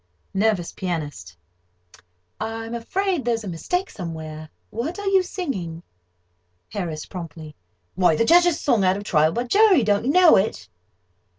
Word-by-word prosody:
NERVOUS 195 -3 +1
PIANIST: 150 - -5 1.0
"I'm 225 +1 -5
afraid 360 +7 -1
there's 230 -2 -1
a - - -7
mistake 360 - -2
somewhere. 155 -3 -7 0.2
What 260 - -4
are 405 - -6
you 390 -1 +4
singing?" 210 - -5 0.9
HARRIS 165 -6 -4
(promptly): 160 -4 -9 0.4
"Why 180 -3 +3
the 230 - +2
Judge's 345 +2 +5
song 230 -8 +2
out 185 +1 +3
of 205 - -6
Trial 155 -5 +3
by 240 +8 -1
Jury. 385 - +4
Don't 205 +1 +1
you 270 - +2
know 360 0 +7
it?" 195 +3 -1
210 Hz, 140 wpm, -23 LUFS, -, 1.0 s, know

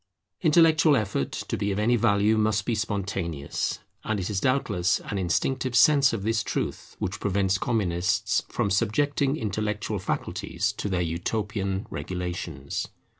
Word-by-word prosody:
Intellectual 160 -2 +5
effort, 100 - -1
to - - -4
be 100 +1 -1
of 95 - -2
any 115 +4 +3
value, 105 -1 +3
must 105 -2 +1
be 120 - 0
spontaneous; 95 -8 -2 0.3
and 110 -2 -1
it 95 +3 -3
is 100 - 0
doubtless 105 -10 +1
an 100 - -4
instinctive 125 +8 0
sense 140 +3 +6
of 110 -4 -3
this 115 +1 +1
truth - - -4
which 95 - -3
prevents 95 -1 +1
Communists 95 -6 +1
from 100 - -1
subjecting 140 +7 +1
intellectual 105 -1 -2
faculties 95 - -2
to 105 - -4
their 90 -2 0
utopian 95 +3 -2
regulations. 90 -6 -4
105 Hz, 140 wpm, -26 LUFS, 95-115 Hz, 0.3 s, sense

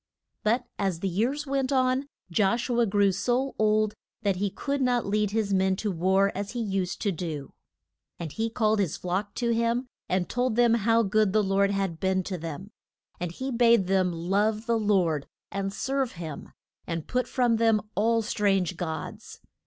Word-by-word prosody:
But 235 +4 +1
as 190 -4 -1
the 195 - 0
years 240 - 0
went 270 -1 -1
on, 260 +1 +2 0.2
Josh 210 +7 +1
u 240 -1 +1
a 235 - +4
grew 200 0 +3
so 250 +7 0
old 215 0 +3 0.3
that 200 -3 +1
he 200 +2 0
could 280 +7 -3
not 245 -2 +2
lead 210 0 +1
his 205 -1 0
men 190 0 +3
to 210 +1 -2
war 190 +3 +2
as 200 +3 -4
he 245 - -3
used 195 -5 -2
to 205 - +2
do. 155 -5 -5 0.6
And 165 -3 -5
he 225 +5 -2
called 220 -2 +1
his 190 -7 0
flock 190 +3 -3
to 235 -1 0
him 235 +2 +1 0.2
and 180 -1 +1
told 245 +1 0
them 240 -1 +4
how 230 +1 +3
good 210 -1 +2
the 215 -1 +3
Lord 195 0 +2
had 195 -4 -1
been 190 0 +1
to 185 -1 -4
them. 165 +5 -7 0.5
And 175 -1 -3
he 260 +9 -4
bade 235 -4 +4
them 185 -1 +2
love 205 +6 0
the 230 -1 +1
Lord 180 -9 +1 0.2
and 195 0 -2
serve 265 +4 -1
him, 165 -4 -7 0.4
and 165 -2 -3
put 250 0 0
from 240 -3 +2
them 225 -1 +4
all 225 +2 +2
strange 195 -5 +1
gods. 160 -3 -6
205 Hz, 185 wpm, -27 LUFS, 190-235 Hz, 0.6 s, a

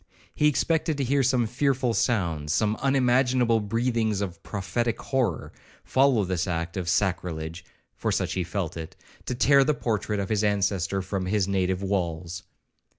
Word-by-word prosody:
He 150 - +3
expected 160 +1 +1
to 140 - 0
hear 140 +2 +2
some 125 -2 +2
fearful 125 +1 0
sounds, 85 - 0
some 110 +2 +1
unimaginable 125 -3 +3
breathings 115 0 0
of 90 -5 -4
prophetic 115 +3 -2
horror, 125 - -1 0.3
follow 130 -5 +3
this 90 0 -1
act 85 -1 -3
of 90 -3 -2
sacrilege, 90 -3 -1 0.3
for - - -1
such - - -1
he 95 - -1
felt 85 -1 -3
it, 80 -1 -7 0.3
to 125 - -1
tear 140 +2 +5
the 150 +2 +1
portrait 105 -4 -1
of 100 - -3
his 110 -1 +1
ancestor 100 -2 0
from 95 -1 -3
his 100 -1 +1
native 95 -1 0
walls. 85 -3 -2
105 Hz, 155 wpm, -26 LUFS, 90-125 Hz, 0.3 s, tear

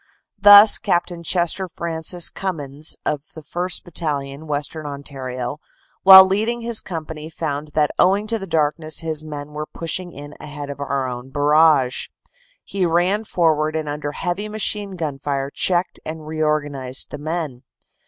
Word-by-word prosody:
Thus 205 +2 +9
Capt. 175 -2 0
Chester 180 +2 +1
Francis 170 +1 -1
Cummins 150 -5 -3
of 150 - -1
the 160 - -8
1st. 175 +4 -3
Battalion, 150 -3 -4
Western 150 +1 -3
Ontario, 135 -2 -6 0.4
while 190 0 +11
leading 220 +5 -1
in - - -7
his 230 - +2
com 165 -4 -6
pany 155 0 -8
found 150 -2 -3
that 150 -1 +2
owing 195 +3 +3
to 225 +1 -2
the 195 - -7
darkness 155 -1 0
his 160 -2 -2
men 150 -1 -7
were 150 0 -5
pushing 175 +2 -4
in 145 0 -10
ahead 145 -1 -7
of 140 - -9
our 140 -2 -2
own 125 +1 -7
barrage. 145 -2 +3 0.6
He 195 -2 -3
ran 180 +5 +1
forward 155 -4 +1
and 155 -1 -2
under 145 0 -4
heavy 190 +7 -3
machine 210 -2 0
gun 150 -5 -4
fire 140 -1 -3
checked 180 +3 0
and 155 0 -7
reorganized 150 -4 -2
the 145 - -6
men. 155 -4 -4
155 Hz, 155 wpm, -21 LUFS, 145-180 Hz, 0.6 s, while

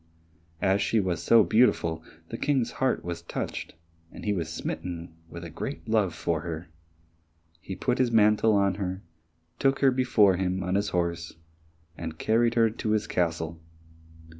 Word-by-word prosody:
As 100 0 +3
she 115 - +2
was 90 -5 -1
so 115 +5 +6
beautiful, 85 -9 +2 0.3
the 115 - -5
King's 135 -5 +1
heart 130 -8 +1
was 85 -1 -4
touched, 85 - -5 0.4
and - - -10
he 105 - +1
was 80 -4 -3
smitten 85 0 -5 0.2
with 85 0 -8
a 85 - -7
great 135 - -6
love 105 -6 +1
for 85 -2 -1
her. 85 0 -6 0.9
He 95 - -7
put 125 +7 -1
his 125 -2 +2
mantle 110 0 +4
on 100 -1 +3
her, 95 +1 -3 0.6
took 135 0 +3
her 135 -1 +5
before 120 -7 +3
him 95 0 -1
on 90 0 -2
his 100 +1 +1
horse, 85 -2 -2 0.6
and 80 -1 -6
carried 115 +4 +2
her 115 -2 +4
to 110 0 -4
his 105 -1 +1
castle. 85 -3 -2
95 Hz, 165 wpm, -27 LUFS, 85-115 Hz, 0.9 s, so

